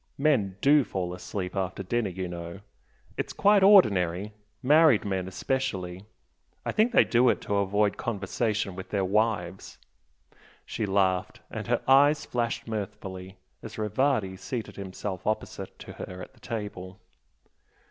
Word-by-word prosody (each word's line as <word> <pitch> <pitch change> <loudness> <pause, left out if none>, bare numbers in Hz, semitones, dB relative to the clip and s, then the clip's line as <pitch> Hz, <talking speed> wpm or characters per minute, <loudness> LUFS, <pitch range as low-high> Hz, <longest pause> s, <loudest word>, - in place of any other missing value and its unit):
Men 125 -11 +1
DO 145 +1 +5
fall 90 -5 -4
asleep 90 +1 -5
after 95 0 -2
dinner 115 +2 -1
you 95 0 -4
know! 85 +2 -7 0.6
it's - - -3
quite 205 0 +4
ordinary. 105 - +5 0.3
Married 150 -4 +5
men 95 -2 -2
especially! 95 -4 -3 0.6
I - - 0
think 220 +3 +2
they 255 - +6
do 125 +1 +3
it - - +1
to 100 - -1
avoid 100 +1 +1
conversation 105 -1 -2
with 95 - -8
their 100 -2 0
wives!" 100 -3 -1 0.9
She 110 -2 -3
laughed, 95 -2 +1
and - - -5
her - - 0
eyes 145 +3 +5
flashed 115 -1 -2
mirthfully 95 -3 -6 0.2
as 110 0 -9
Rivardi 110 -2 0
seated 115 +2 -5
himself 95 -1 -6
opposite 110 - -3
to - - -10
her 90 0 -8
at - - -15
table. 105 -5 -6
100 Hz, 135 wpm, -27 LUFS, 95-120 Hz, 0.9 s, they